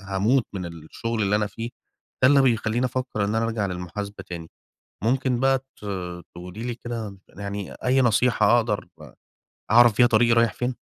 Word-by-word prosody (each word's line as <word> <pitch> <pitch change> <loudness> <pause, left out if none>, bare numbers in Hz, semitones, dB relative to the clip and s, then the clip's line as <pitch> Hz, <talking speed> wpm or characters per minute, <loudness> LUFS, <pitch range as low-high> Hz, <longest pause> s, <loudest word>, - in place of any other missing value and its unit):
هاموت 100 +6 +1
من 90 -3 -4
الشُغل 85 +8 -4
اللي 100 +1 +2
أنا 105 0 0
فيه، 115 +4 -6 0.5
ده 130 - +7
اللي 140 -1 +6
بيخلّيني 120 -1 +1
أفكّر 125 -4 -2
إن 105 - -1
أنا 110 +1 +1
أرجع 110 -3 -1
للمحاسبة 95 +2 -6
تاني 85 -2 -7 0.6
ممكن 125 +1 +1
بقى 135 0 +3
ت 135 -5 -17 0.5
تقولي 90 +6 -8
لي 120 -1 -3
كده 115 -5 -6
يعني 100 0 -6
أي 130 +1 +1
نصيحة 120 0 +4
أقدر 110 -3 -1 0.8
أعرف 120 -2 +6
بيها 120 - +6
طريقي 115 0 +4
رايح 115 -1 +4
فين. 125 0 -2
115 Hz, 165 wpm, -24 LUFS, 100-120 Hz, 0.8 s, ده